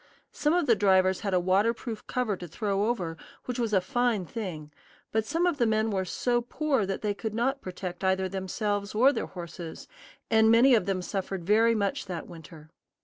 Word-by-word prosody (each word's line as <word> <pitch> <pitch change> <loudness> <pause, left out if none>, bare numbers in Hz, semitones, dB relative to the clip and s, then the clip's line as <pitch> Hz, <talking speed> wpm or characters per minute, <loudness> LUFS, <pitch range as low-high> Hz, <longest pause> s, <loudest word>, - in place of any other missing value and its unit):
Some 300 +1 +1
of 355 -3 +2
the 235 - +4
drivers 190 -2 +3
had 200 -3 -1
a - - +4
waterproof 210 +5 0
cover 245 -5 -1
to 175 -1 -8
throw 200 +4 -1
over, 180 -9 -2 0.3
which 250 0 -4
was 230 -2 0
a 195 - +4
fine 220 +1 0
thing; 165 -8 -6 0.4
but 220 0 0
some 330 +6 +1
of 345 -5 0
the 235 - +3
men 220 0 +1
were 190 -2 -1
so 240 +6 0
poor 265 -3 -1
that 195 +2 -4
they 210 -1 +1
could 215 +1 -5
not 265 +4 0
protect 180 0 -6
either 190 0 +1
themselves 200 +2 -3
or 260 +6 +5
their - - -3
horses, 170 -2 -8 0.4
and 220 0 +5
many 240 +4 +6
of 225 - +3
them 185 -2 -1
suffered 195 -1 -4
very 225 +4 +4
much 200 -2 -1
that 175 -3 -5
winter. 160 -2 -13
205 Hz, 200 wpm, -28 LUFS, 185-230 Hz, 0.4 s, many